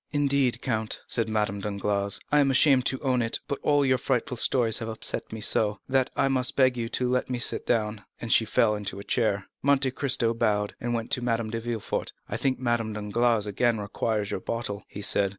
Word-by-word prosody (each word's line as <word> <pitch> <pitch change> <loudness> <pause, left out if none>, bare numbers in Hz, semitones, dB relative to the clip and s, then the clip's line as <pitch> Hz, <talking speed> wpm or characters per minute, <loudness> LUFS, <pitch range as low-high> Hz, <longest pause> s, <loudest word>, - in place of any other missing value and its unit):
"Indeed, 140 -3 +1
count," 110 -4 -2
said 115 -1 0
Madame 105 -2 -1
Danglars, 100 0 -1
"I 150 - +5
am 140 -1 +4
ashamed 135 -1 +4
to 130 - -1
own 130 -3 +1
it, 115 0 -1
but 140 - -3
all 145 -1 +3
your 130 -1 +2
frightful 125 -1 -1
stories 120 -1 +2
have 115 - -5
so - - -3
upset 110 - -1
me, 110 0 -6 0.5
that 130 -1 +2
I - - +2
must 130 -2 +1
beg 130 -2 +4
you 115 -2 -3
to 125 +1 0
let 125 0 0
me 125 - -1
sit 120 - 0
down;" 105 -3 0 0.2
and 115 - 0
she - - +5
fell 110 0 +2
into 105 -2 -4
a 100 - -7
chair. 105 -5 0 0.2
Monte 140 -1 +2
Cristo 130 -4 +1
bowed, 105 -3 0
and 120 0 -1
went 115 -1 -4
to 125 - +1
Madame 115 -2 -1
de 115 - -2
Villefort. 115 -2 -3
"I - - -4
think 130 -1 0
Madame 120 -3 -1
Danglars 105 +1 +1
again 115 +3 +1
requires 105 0 -2
your - - -2
bottle," 105 -1 -4
he 105 - -7
said. 100 -1 +3
115 Hz, 215 wpm, -26 LUFS, 105-130 Hz, 0.5 s, I